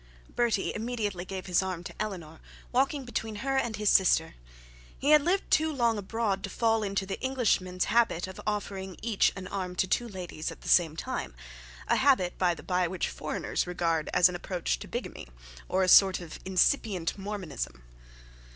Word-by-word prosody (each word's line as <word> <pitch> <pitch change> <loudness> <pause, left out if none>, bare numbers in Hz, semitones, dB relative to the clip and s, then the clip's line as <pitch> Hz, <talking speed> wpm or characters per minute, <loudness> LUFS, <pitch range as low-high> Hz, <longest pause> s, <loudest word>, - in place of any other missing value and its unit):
Bertie 235 -5 +1
immediately 215 -5 -3
gave 190 -1 -6
his 180 -1 +2
arm 185 -2 -4
to - - -8
Eleanor, 175 -7 -5 0.3
walking 270 +2 +1
between 220 -3 -4
her 270 0 0
and 235 -4 0
his 210 -1 +2
sister. 190 - +4 0.6
He 285 - +1
had 300 -1 +8
lived 365 +6 0
too 315 0 +3
long 235 -6 +1
abroad 205 -1 -2
to 200 - -3
fall 225 +1 +1
into 195 -1 -1
an 195 - -5
Englishman's 210 -9 +1
habit 230 -7 +2
of 190 0 -9
offering 195 -3 -3
each 225 -3 +2
an 190 -2 -7
arm 185 -2 -4
to 185 - +2
two 240 +6 0
ladies 180 -6 -5
at - - -12
the - - -6
same 165 -3 +4
time; 110 - -4 0.5
a - - +3
habit, 260 -10 +3
by 180 -2 +2
the - - -12
bye, 180 -1 +1
which 180 +1 -2
foreigners - - -3
regard 165 -3 -1
as 180 0 +6
an 180 - -4
approach 175 - -2
to - - -8
bigamy, - - -6 0.4
or 190 +1 +2
a - - +1
sort 190 0 +7
of 170 -3 -9
incipient 190 -1 +1
Mormonism. 190 - -5
195 Hz, 180 wpm, -29 LUFS, 180-225 Hz, 0.6 s, had